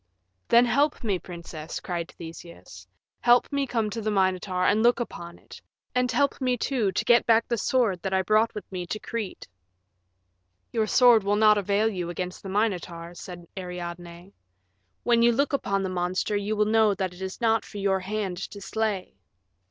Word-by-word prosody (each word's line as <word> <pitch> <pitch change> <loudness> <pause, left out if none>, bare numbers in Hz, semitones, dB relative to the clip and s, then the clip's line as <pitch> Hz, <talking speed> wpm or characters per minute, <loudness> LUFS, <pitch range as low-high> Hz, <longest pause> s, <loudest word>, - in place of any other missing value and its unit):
"Then 235 +1 +6
help 280 +5 +1
me, 200 -5 0
princess," 170 -3 -8
cried 170 -2 -4
Theseus; 160 - -11 0.3
"help 240 0 +4
me 280 -1 0
to - - -13
come 225 -3 0
to 225 - -4
the 215 - -1
Minotaur 185 -2 +1
and 215 - +3
look 240 +1 +4
upon 170 -7 -6
it, - - -14 0.3
and 250 -1 +1
help 280 +3 +1
me, 250 -1 +1
too, 230 -5 0
to - - -2
get 240 0 +4
back 230 0 +4
the 240 - 0
sword 220 -9 +1
that 190 - -3
I 190 0 +2
brought 215 +4 +2
with 210 - -5
me 180 -2 -5
to 215 - -3
Crete." 225 -5 -5 1.2
"Your 220 -2 0
sword 240 -2 +6
will 200 +1 +1
not 210 0 +5
avail 200 +2 +1
you 180 -5 -3
against 180 +1 -5
the 195 - -8
Minotaur," 180 -5 -2
said 175 -1 -10
Ariadne; 175 0 -7 0.7
"when 235 -1 +3
you 235 0 +6
look 280 +5 0
upon 195 -8 0
the 190 - -2
monster 185 +3 -1
you 205 +1 -1
will 210 0 +2
know 215 -1 +3
that 190 -2 -3
it 180 - -13
is 190 0 -5
not 225 -2 +2
for 210 - -10
your 195 -1 +1
hand 195 -1 -3
to 200 +2 -7
slay." 205 -2 -2
200 Hz, 190 wpm, -26 LUFS, 180-225 Hz, 1.2 s, Then